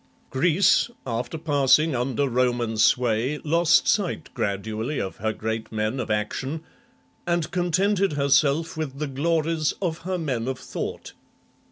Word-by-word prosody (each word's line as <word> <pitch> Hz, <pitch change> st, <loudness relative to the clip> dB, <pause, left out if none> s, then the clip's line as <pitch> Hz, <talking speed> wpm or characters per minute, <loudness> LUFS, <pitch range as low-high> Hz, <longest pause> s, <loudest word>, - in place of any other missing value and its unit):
Greece, 175 Hz, -, +3 dB, 0.2 s
after 120 Hz, +4 st, -3 dB
passing 145 Hz, 0 st, +3 dB
under 130 Hz, +3 st, 0 dB
Roman 120 Hz, -2 st, 0 dB
sway, 120 Hz, +4 st, +2 dB
lost 165 Hz, +2 st, +3 dB
sight 190 Hz, -7 st, 0 dB
gradually 110 Hz, +5 st, -2 dB
of 95 Hz, -, -4 dB
her 110 Hz, +2 st, -1 dB
great 110 Hz, +1 st, -4 dB
men 110 Hz, +4 st, -1 dB
of 125 Hz, -, -3 dB
action, 130 Hz, +9 st, -2 dB, 0.6 s
and 170 Hz, -1 st, 0 dB
contented 185 Hz, +1 st, +1 dB
herself 140 Hz, +3 st, +2 dB
with 150 Hz, -4 st, -4 dB
the 150 Hz, -, -2 dB
glories 155 Hz, +2 st, 0 dB
of 170 Hz, -4 st, -2 dB
her 185 Hz, +2 st, -3 dB
men 130 Hz, -8 st, -2 dB
of 130 Hz, -1 st, -2 dB
thought. -, -, -6 dB
140 Hz, 135 wpm, -24 LUFS, 120-165 Hz, 0.6 s, Greece